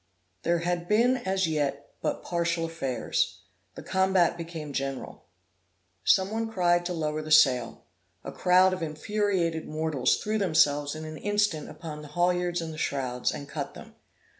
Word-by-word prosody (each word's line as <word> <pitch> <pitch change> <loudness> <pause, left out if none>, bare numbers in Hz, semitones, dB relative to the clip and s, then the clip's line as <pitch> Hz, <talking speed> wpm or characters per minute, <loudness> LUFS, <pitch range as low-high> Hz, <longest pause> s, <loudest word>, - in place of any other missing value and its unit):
There 170 +1 +2
had 175 -1 -1
been 235 +5 +3
as 190 -5 0
yet 145 -3 -2
but - - -2
partial 170 -1 0
affairs; 135 -8 -2 0.3
the - - -8
combat 190 -2 +2
became 165 -3 -7
general. 135 -6 -4 0.8
Some 190 +1 +3
one 225 0 -2
cried 175 -3 +2
to 180 - -3
lower 155 -2 -2
the 155 - -8
sail; 130 -6 +4 0.4
a - - -6
crowd 185 +1 +4
of 185 - -4
infuriated 165 +1 -1
mortals 155 -4 +1
threw 215 +1 -1
themselves 145 -5 +2
in 155 0 -6
an 155 0 -7
instant 205 -6 0
upon 155 -1 -8
the 150 - -10
haulyards 175 +2 0
and 160 -1 -5
the 155 - -8
shrouds, 125 -4 -1
and 140 - -7
cut - - -5
them. - - -12
165 Hz, 160 wpm, -27 LUFS, 150-185 Hz, 0.8 s, sail